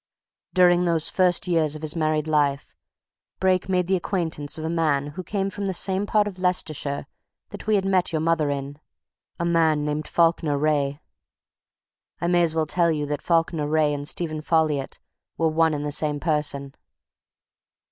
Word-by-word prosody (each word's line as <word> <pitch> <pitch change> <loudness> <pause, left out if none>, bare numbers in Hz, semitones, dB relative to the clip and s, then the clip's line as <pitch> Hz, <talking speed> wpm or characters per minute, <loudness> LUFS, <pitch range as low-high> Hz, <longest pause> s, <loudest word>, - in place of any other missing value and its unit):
During 180 -1 +5
those 165 -2 +1
first 180 -1 +2
years 160 -4 +1
of 155 - -9
his 155 +1 -1
married 155 -2 0
life 145 -3 0 0.6
Brake 185 0 +1
made 180 -1 +1
the 190 +2 +1
acquaintance 165 -6 -2
of 160 - -5
a - - -1
man 155 -4 0
who 170 - -6
came 195 +1 -2
from 200 0 -4
the 190 - -1
same 190 +3 +1
part 210 -1 +2
of 190 -3 -7
Leicestershire 155 -6 -1 0.4
that - - -10
we 215 - +3
had 195 -1 +1
met 190 -2 +1
your 160 - 0
mother 160 -2 +1
in 140 +1 -4 0.6
a 170 - -1
man 160 -3 +2
named 150 0 -2
Falkiner 165 -3 +2
Wraye. 145 -1 0 1.2
I - - -2
may 175 0 +3
as 165 -2 +1
well 160 -1 +1
tell 170 +2 +1
you 150 -2 -1
that 145 0 -3
Falkiner 165 -3 +1
Wraye 155 -1 +2
and 145 0 -5
Stephen 155 -1 -3
Folliot 155 -4 0 0.4
were 165 -1 +2
one 160 0 +2
and 145 0 -4
the 145 - -2
same 150 0 -1
person." 145 -3 -2
160 Hz, 180 wpm, -24 LUFS, 150-175 Hz, 1.2 s, During